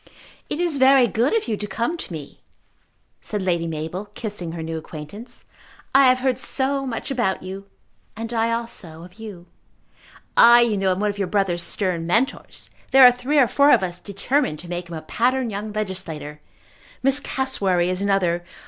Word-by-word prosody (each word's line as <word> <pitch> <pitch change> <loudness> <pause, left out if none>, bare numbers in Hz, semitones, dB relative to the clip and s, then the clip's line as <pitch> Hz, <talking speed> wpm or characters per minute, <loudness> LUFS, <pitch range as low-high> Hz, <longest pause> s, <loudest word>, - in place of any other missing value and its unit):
"It 300 - -3
is 340 -5 0
very 265 -1 +6
good 240 - +1
of 440 - -3
you 225 - 0
to 210 - -5
come 230 - -2
to 330 - -7
me," 155 -4 -9 0.8
said 210 -2 -3
Lady 170 -2 0
Mabel, 160 +5 -5
kissing 200 -7 -5
her 165 -1 -5
new 165 0 -4
acquaintance. 160 +9 -10 0.5
"I 270 0 +7
have 255 0 +3
heard 260 -1 0
so 275 +1 -1
much 240 +2 -4
about 235 -9 -1
you." 195 +1 -8 0.5
"And 230 +1 -5
I 230 0 +1
also 210 -9 -5
of 180 +4 -15
you." 200 -6 -9 0.9
"I, 240 +1 +8
you 235 -3 +2
know, 195 -1 0
am 185 +1 0
one 210 0 +1
of 205 - -11
your 195 - 0
brother's 185 -3 0
stern 170 -2 +1
Mentors. 230 +10 -1 0.2
There 265 0 +8
are 250 - +10
three 250 +5 -2
or 265 -4 +6
four 285 +5 +4
of - - +5
us 180 -1 -4
determined 205 - -1
to 175 - -11
make 175 -1 -5
him 170 - -6
a 155 - -7
pattern 245 +6 0
young 210 +2 -5
legislator. 165 -8 -5 0.6
Miss 270 +2 +4
Cassewary 200 -11 0
is 185 +1 -3
another. 185 -4 +1
205 Hz, 185 wpm, -22 LUFS, 175-250 Hz, 0.9 s, are